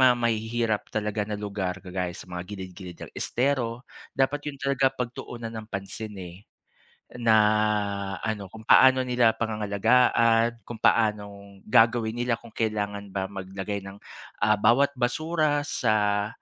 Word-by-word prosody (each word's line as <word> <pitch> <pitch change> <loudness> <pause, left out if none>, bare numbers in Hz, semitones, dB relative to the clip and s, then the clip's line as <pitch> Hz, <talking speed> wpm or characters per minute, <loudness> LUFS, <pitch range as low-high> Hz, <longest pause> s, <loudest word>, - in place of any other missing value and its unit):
ma 120 -1 +1
mahihirap 110 0 -1
talaga 105 -1 -2
na 105 - -3
lugar 100 -2 -4
kagaya 90 -1 -4
sa - - -8
mga 90 -1 -6
gilid-gilid 95 -3 -8
ng - - -10
estero, 125 -2 -1 0.3
dapat 145 +2 0
'yon 140 - -8
talaga 140 0 +2
pagtuunan 120 -1 -5
ng 110 -1 -7
pansin, 105 +1 -6
eh. 90 -2 -8 0.8
Na 115 -2 +3 0.9
ano, 105 -4 -3
kung 110 +1 -12
paano 130 +2 +6
nila 125 -2 +3
pangangalagaan, 115 +2 +2
kung 115 -1 -9
paanong 100 -3 0
gagawin 115 0 +3
nila 120 0 0
kung 115 0 -6
kailangan 105 -3 -3
ba 95 -1 -2
maglagay 95 +1 -5
ng, 100 +1 -10 0.4
ah, 105 +1 +4
bawat 120 +7 +4
basura 150 +4 +1
sa, 105 -7 +1
110 Hz, 135 wpm, -26 LUFS, 100-120 Hz, 0.9 s, paano